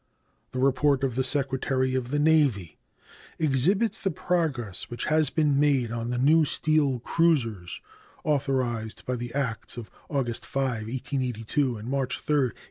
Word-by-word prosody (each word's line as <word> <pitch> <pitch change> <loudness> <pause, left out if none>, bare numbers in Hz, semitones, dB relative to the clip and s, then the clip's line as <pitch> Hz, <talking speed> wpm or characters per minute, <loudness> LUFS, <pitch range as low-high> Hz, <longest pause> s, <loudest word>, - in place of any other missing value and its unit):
The 130 - -6
report 135 +1 +2
of 130 -3 +1
the 130 +2 0
Secretary 130 -1 0
of 130 -2 -1
the 145 - 0
Navy 145 - +2 0.6
exhibits 165 - +1
the 195 - +1
progress 150 - -2
which 120 - -4
has 155 0 +2
been 150 -3 +2
made 135 -6 +2
on 115 0 -3
the 125 - -1
new 155 +6 +5
steel 150 -3 +2
cruisers 115 - 0 0.4
authorized 130 -6 -1
by 125 - -1
the 120 0 -5
acts 125 -5 -2
of 115 -3 -8 0.2
August 125 -5 -2
5, 125 -5 -2
1882, 125 0 -1
and 105 +2 -8
March 135 -1 -1
3, 150 - 0
1883. 130 -5 0
130 Hz, 150 wpm, -27 LUFS, 120-145 Hz, 0.6 s, new